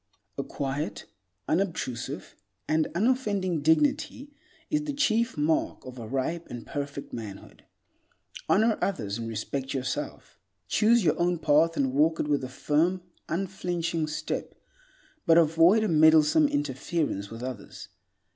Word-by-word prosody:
A - - -3
quiet, 135 -7 -4 0.4
unobtrusive, 165 -9 -2 0.3
and 155 0 +2
unoffending 200 - +1
dignity 275 - +1 0.4
is 300 -1 +1
the 290 - -2
chief 235 - +1
mark 155 +2 0
of 130 -1 -9
a 115 - -7
ripe 135 +7 -2
and 120 -2 -7
perfect 140 -1 -5
manhood. 105 -4 -9 0.8
Honor 220 +2 +3
others 110 - -2
and 115 0 -4
respect 130 +5 -4
yourself. 130 -8 -4 0.3
Choose 225 - +4
your - - +2
own 175 0 +2
path 160 +1 +3
and 130 -2 +1
walk 155 +3 +3
it - - 0
with 145 -2 +1
a 130 - -4
firm, 165 +7 0 0.3
unflinching 170 -3 -2
step, 150 - -4 0.7
but 165 0 +6
avoid 165 +6 +5
a - - +1
meddlesome 160 - +5
interference 145 - -2
with 115 +2 -8
others. 125 -5 -7
160 Hz, 130 wpm, -27 LUFS, 135-190 Hz, 0.8 s, but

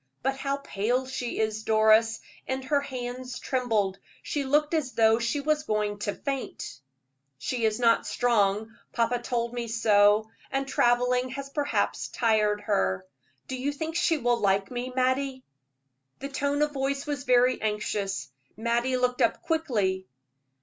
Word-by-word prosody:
But 270 +1 +1
how 275 +1 -1
pale 250 -1 -1
she 255 -2 -4
is, 220 0 0
Doris, 220 +1 +4 0.3
and 260 0 -2
her 285 +2 +1
hands 250 -1 -5
trembled. 220 -7 0 0.2
She 290 - -2
looked 295 +3 +2
as 295 -6 0
though 225 0 +4
she 235 +5 0
was 305 +1 +1
going 210 -6 -1
to 205 0 -2
faint." 270 - -5 0.6
"She 235 - -2
is 215 0 +1
not 230 -1 +3
strong 220 -2 +1 0.2
papa 235 +1 +1
told 235 -1 -2
me 240 -1 -3
so 215 -1 +4 0.2
and 270 0 -1
traveling 250 0 +2
has 275 +1 -6
perhaps 290 0 0
tired 215 -3 +1
her. 95 - 0 0.4
Do 260 - -4
you 265 +3 -1
think 320 +2 -5
she 340 -2 +2
will 240 -3 +1
like 195 0 +1
me, 250 +1 -4
Mattie?" 260 +1 0 0.7
The 275 - -6
tone 285 +1 0
of 300 - 0
voice 275 0 -2
was 285 -2 -3
very 250 0 +4
anxious. 210 -7 -2 0.3
Mattie 240 +3 +1
looked 250 0 0
up - - +2
quickly. 210 - 0
245 Hz, 150 wpm, -27 LUFS, 220-270 Hz, 0.7 s, Doris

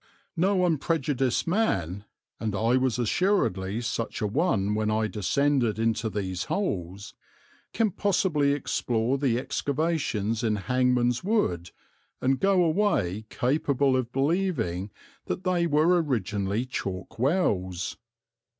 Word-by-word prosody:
No 185 +2 +2
unprejudiced 145 -5 0
man, 100 - 0 0.3
and 110 -3 -2
I 115 +5 +2
was 130 -2 +1
assuredly 115 - 0
such 115 -1 -3
a - - -1
one 105 - +1
when 105 0 0
I 110 +1 +1
descended 120 +3 +1
into 115 0 0
these 95 -3 -3
holes, 100 - -3 0.6
can 225 -3 +1
possibly 180 -7 +1
explore 125 -2 -1
the 130 -4 +1
excavations 130 -6 -1
in 110 -2 +1
Hangman's 125 - +1
Wood 90 - 0 0.5
and 130 +1 +1
go 195 -2 +3
away 155 - +1
capable 140 0 +1
of 125 -2 -1
believing 135 - 0 0.4
that 185 - -4
they 175 -2 +1
were 165 +3 +3
originally 105 - -1
chalk 95 -4 -5
wells. 95 - 0
125 Hz, 115 wpm, -27 LUFS, 105-160 Hz, 0.6 s, go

